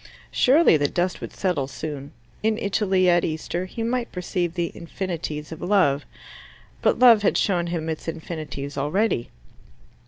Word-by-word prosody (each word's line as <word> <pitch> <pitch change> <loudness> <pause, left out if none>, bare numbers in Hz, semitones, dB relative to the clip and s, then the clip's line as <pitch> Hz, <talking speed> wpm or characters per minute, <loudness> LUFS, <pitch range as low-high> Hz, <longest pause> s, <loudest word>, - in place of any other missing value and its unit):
Surely 275 - +5
the 145 -1 +1
dust 180 +4 -1
would - - -6
settle 175 -8 -1
soon: 140 0 -6 0.3
in 220 0 +1
Italy, 195 -3 +1
at 175 -1 +4
Easter, 165 +3 -2
he 225 +5 -5
might 240 +1 -1
perceive 180 -1 -2
the 170 -2 -1
infinities 165 -4 -5
of 160 - -8
love. 150 - +2 0.8
But - - +3
love 235 -3 +7
had 205 - +2
shown 175 -4 +1
him 165 -2 -3
its 160 0 -4
infinities 155 -4 -5
already. 155 - 0
175 Hz, 150 wpm, -24 LUFS, 155-195 Hz, 0.8 s, love